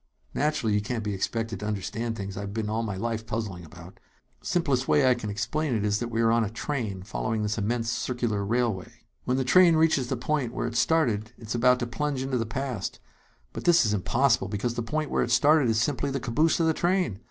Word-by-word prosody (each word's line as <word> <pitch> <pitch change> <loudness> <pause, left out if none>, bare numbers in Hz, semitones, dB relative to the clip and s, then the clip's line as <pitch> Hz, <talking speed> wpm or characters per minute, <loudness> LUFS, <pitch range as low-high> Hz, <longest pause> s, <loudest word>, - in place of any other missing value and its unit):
"Naturally 150 -8 0
you 105 - +2
can't 115 +1 -3
be 105 -1 -2
expected 110 +2 -2
to 105 - -4
understand 110 +3 -3
things 100 -2 -5
I've 100 +1 -5
been 110 -1 -2
all 110 +1 0
my 105 -4 -3
life 115 +1 -3
puzzling 105 -6 -4
about. 80 - -13 0.4
Simplest 140 -7 0
way 145 -3 +4
I 130 - +6
can 120 -4 -5
explain 130 +7 -1
it 105 -1 0
is 105 0 +1
that 120 - -2
we 115 0 -1
are 115 0 +4
on 115 0 +3
a 105 - -2
train 110 -5 -4
following 110 +2 -2
this 105 +2 -1
immense 115 +2 -1
circular 120 -4 -1
railway. 110 -3 -2 0.2
"When 125 +1 +1
the 135 - +1
train 170 +5 +6
reaches 155 -5 +3
the 130 - -2
point 125 -1 -1
where - - -2
it - - -4
started, 120 -6 +1
it 110 - -12
is - - -1
about 125 +1 +4
to - - 0
plunge 140 +2 -2
into 130 -2 -1
the 115 - -2
past; 125 -4 -4 0.5
but - - -7
this 175 -5 +5
is 105 - +1
impossible, 120 +2 +2
because 105 +4 -2
the 120 - -3
point 150 +6 -2
where - - +1
it - - 0
started 145 +2 +4
is 110 -1 +2
simply 140 +3 0
the 135 0 -2
caboose 150 +9 +1
of 165 - +3
the 160 - +3
train! 175 - 0
115 Hz, 230 wpm, -27 LUFS, 105-135 Hz, 0.5 s, I